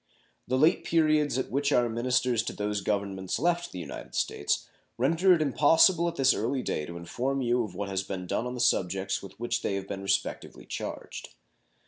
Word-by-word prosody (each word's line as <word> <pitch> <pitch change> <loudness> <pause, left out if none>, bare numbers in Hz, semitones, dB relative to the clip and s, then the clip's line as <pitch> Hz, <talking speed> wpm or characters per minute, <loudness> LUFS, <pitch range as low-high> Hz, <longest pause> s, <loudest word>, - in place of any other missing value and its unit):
The 130 - +1
late 155 +5 +4
periods 155 -4 +2
at 130 - -3
which 140 +2 0
our 120 -3 +3
ministers 120 0 +1
to - - -3
those 105 -1 -2
Governments 100 -2 -2
left 175 +5 0
the - - -8
United 80 -6 -8
States - - -1 0.3
render 165 +9 +3
it 165 -3 +5
impossible 165 +5 +4
at 170 - -3
this 135 -2 +4
early 135 -2 -1
day 75 - -2
to 85 - -7
inform 130 +10 -2
you 120 0 +2
of 100 -5 -8
what 100 +1 -4
has 95 -1 -1
been 95 -1 -5
done 115 +6 -2
on 125 - -5
the 125 - -3
subjects 95 -2 +1
with 100 +1 -12
which 120 0 -1
they 100 - -1
have 100 0 -4
been 100 -1 -5
respectively 95 - -2
charged. - - -7
120 Hz, 195 wpm, -28 LUFS, 100-145 Hz, 0.3 s, it